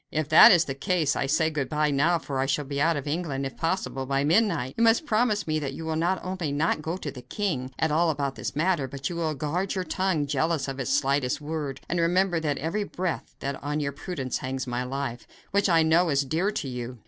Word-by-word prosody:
"If 155 Hz, -1 st, -2 dB
that 160 Hz, -, +9 dB
is 170 Hz, -2 st, +5 dB
the 135 Hz, -, -3 dB
case, 155 Hz, 0 st, 0 dB
I 135 Hz, -, -1 dB
say 160 Hz, +3 st, +2 dB
good 145 Hz, -3 st, -2 dB
bye 150 Hz, -1 st, +1 dB
now, 155 Hz, +5 st, +3 dB
for 140 Hz, -4 st, -4 dB
I 135 Hz, -, +1 dB
shall 145 Hz, +1 st, 0 dB
be 140 Hz, 0 st, -3 dB
out 165 Hz, +1 st, +3 dB
of 140 Hz, -, -5 dB
England, 145 Hz, -3 st, -2 dB
if 135 Hz, -, -5 dB
possible, 165 Hz, -6 st, -2 dB
by 135 Hz, 0 st, +1 dB
midnight. 165 Hz, -, +2 dB
You 230 Hz, -, +1 dB
must 230 Hz, +6 st, +4 dB
promise 215 Hz, -4 st, +1 dB
me 155 Hz, -1 st, 0 dB
that 140 Hz, -2 st, -4 dB
you 160 Hz, -, -7 dB
will 160 Hz, 0 st, -1 dB
not 175 Hz, +4 st, +1 dB
only 185 Hz, -5 st, -3 dB
not 150 Hz, +2 st, 0 dB
go 165 Hz, +4 st, -3 dB
to 150 Hz, -6 st, -5 dB
the 125 Hz, -, -10 dB
king 155 Hz, -, -3 dB
at 160 Hz, -, +1 dB
all 165 Hz, +2 st, +3 dB
about 140 Hz, -3 st, -1 dB
this -, -, -5 dB
matter, 160 Hz, -3 st, +1 dB
but 135 Hz, +1 st, -9 dB
that -, -, 0 dB
you -, -, -5 dB
will 160 Hz, -2 st, -1 dB
guard 165 Hz, +8 st, -2 dB
your 185 Hz, -, -1 dB
tongue, 185 Hz, -5 st, 0 dB
jealous 150 Hz, +2 st, 0 dB
of 135 Hz, 0 st, -5 dB
its 135 Hz, 0 st, -2 dB
slightest 135 Hz, -2 st, +1 dB
word, 150 Hz, -3 st, -4 dB
and 175 Hz, -, -1 dB
remember 175 Hz, +1 st, +2 dB
with 160 Hz, -, -3 dB
every 165 Hz, +8 st, -2 dB
breath 185 Hz, -3 st, -4 dB
that 140 Hz, 0 st, -4 dB
on 150 Hz, +1 st, -1 dB
your 140 Hz, -1 st, -1 dB
prudence 140 Hz, -3 st, -4 dB
hangs 130 Hz, 0 st, -3 dB
my 125 Hz, 0 st, -2 dB
life, 130 Hz, -1 st, -4 dB, 0.2 s
which, 200 Hz, 0 st, +2 dB
I 165 Hz, -2 st, +5 dB
know, 165 Hz, +2 st, +3 dB
is 140 Hz, -1 st, +2 dB
dear 165 Hz, +8 st, 0 dB
to 175 Hz, -8 st, -3 dB
you. 125 Hz, -1 st, -5 dB
155 Hz, 250 wpm, -26 LUFS, 135-175 Hz, 0.2 s, that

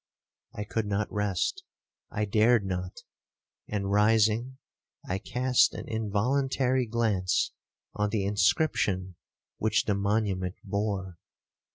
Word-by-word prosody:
I 105 Hz, -, -3 dB
could 105 Hz, +1 st, -2 dB
not 100 Hz, 0 st, -1 dB
rest—I 105 Hz, -, -3 dB
dared 110 Hz, +1 st, +3 dB
not—and 95 Hz, +2 st, -6 dB
rising, 110 Hz, +4 st, +3 dB, 0.5 s
I 95 Hz, +1 st, -1 dB
cast 125 Hz, +3 st, +2 dB
an -, -, -7 dB
involuntary 125 Hz, +4 st, 0 dB
glance 110 Hz, -5 st, +1 dB, 0.4 s
on 105 Hz, 0 st, 0 dB
the 105 Hz, -2 st, -1 dB
inscription 100 Hz, -, +1 dB, 0.4 s
which 110 Hz, 0 st, +2 dB
the 105 Hz, -, +1 dB
monument 100 Hz, -2 st, 0 dB
bore. 100 Hz, -3 st, -3 dB
105 Hz, 95 wpm, -28 LUFS, 100-115 Hz, 0.5 s, dared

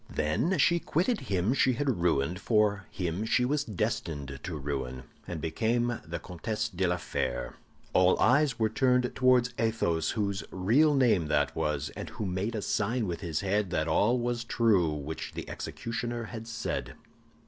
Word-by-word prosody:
Then 80 Hz, -, 0 dB
she 170 Hz, +4 st, +4 dB
quitted 185 Hz, +9 st, 0 dB
him 95 Hz, +4 st, +2 dB
she 130 Hz, -1 st, +3 dB
had 125 Hz, -7 st, -1 dB
ruined 85 Hz, +1 st, +1 dB
for 105 Hz, -4 st, +2 dB
him 90 Hz, +2 st, -3 dB
she 125 Hz, +2 st, +2 dB
was 145 Hz, +3 st, +1 dB
destined 70 Hz, -, -3 dB
to 80 Hz, +2 st, -5 dB
ruin, 65 Hz, -3 st, -4 dB, 0.2 s
and 85 Hz, -2 st, -4 dB
became 115 Hz, +10 st, 0 dB
the 85 Hz, +1 st, -5 dB
Comtesse 105 Hz, +6 st, -3 dB
de 95 Hz, -1 st, 0 dB
la 90 Hz, +1 st, +1 dB
Fère—" 65 Hz, -7 st, -3 dB, 0.4 s
All 90 Hz, 0 st, +4 dB
eyes 135 Hz, -1 st, +4 dB
were 110 Hz, -2 st, +2 dB
turned 125 Hz, +2 st, +2 dB
towards 125 Hz, -1 st, +3 dB
Athos, 110 Hz, -8 st, +1 dB
whose 100 Hz, -2 st, -1 dB
real 125 Hz, +12 st, +3 dB
name 115 Hz, -, +3 dB
that 75 Hz, -1 st, +1 dB
was, 75 Hz, -2 st, -1 dB
and -, -, -6 dB
who 105 Hz, -, -5 dB
made 95 Hz, +5 st, -2 dB
a 105 Hz, -, -3 dB
sign 110 Hz, +3 st, 0 dB
with 85 Hz, -3 st, -3 dB
his 80 Hz, -5 st, -2 dB
head 100 Hz, 0 st, 0 dB
that 80 Hz, -3 st, 0 dB
all 105 Hz, +9 st, +3 dB
was 120 Hz, -1 st, -1 dB
true 110 Hz, -8 st, +3 dB
which 75 Hz, +1 st, -5 dB
the -, -, -6 dB
executioner 120 Hz, 0 st, -4 dB
had 115 Hz, 0 st, -7 dB
said. 115 Hz, 0 st, -4 dB
105 Hz, 170 wpm, -29 LUFS, 85-120 Hz, 0.4 s, she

